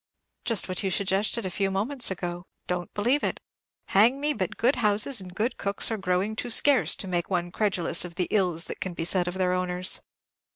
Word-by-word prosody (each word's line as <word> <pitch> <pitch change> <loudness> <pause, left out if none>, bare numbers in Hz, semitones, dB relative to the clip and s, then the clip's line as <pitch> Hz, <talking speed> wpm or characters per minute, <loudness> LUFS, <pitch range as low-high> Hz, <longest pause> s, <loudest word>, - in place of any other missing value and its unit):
"Just 230 -4 +2
what 185 -1 -1
you 195 - -1
suggested 195 +4 +1
a 185 - -3
few 195 +1 0
moments 230 +7 +1
ago, 175 -1 -5 0.2
don't 180 -1 -3
believe 245 +8 +1
it. - - -1 0.5
Hang 230 +7 +4
me, 295 +1 0
but 185 -9 -4
good 250 +5 +2
houses 210 +3 +3
and 180 -1 -11
good 225 +5 -1
cooks 200 +3 0
are 225 - -1
growing 190 +2 -1
too 240 - -3
scarce 275 +3 +4
to 195 - -6
make 175 -2 -2
one 175 -2 -1
credulous 185 -6 +1
of 175 -2 -9
the 180 -1 -1
ills 180 -4 +1
that - - -8
can 185 -2 -4
be 165 - -3
said 180 0 +2
of 175 - -3
their 185 -1 +1
owners." 180 0 0
190 Hz, 210 wpm, -26 LUFS, 180-215 Hz, 0.5 s, Hang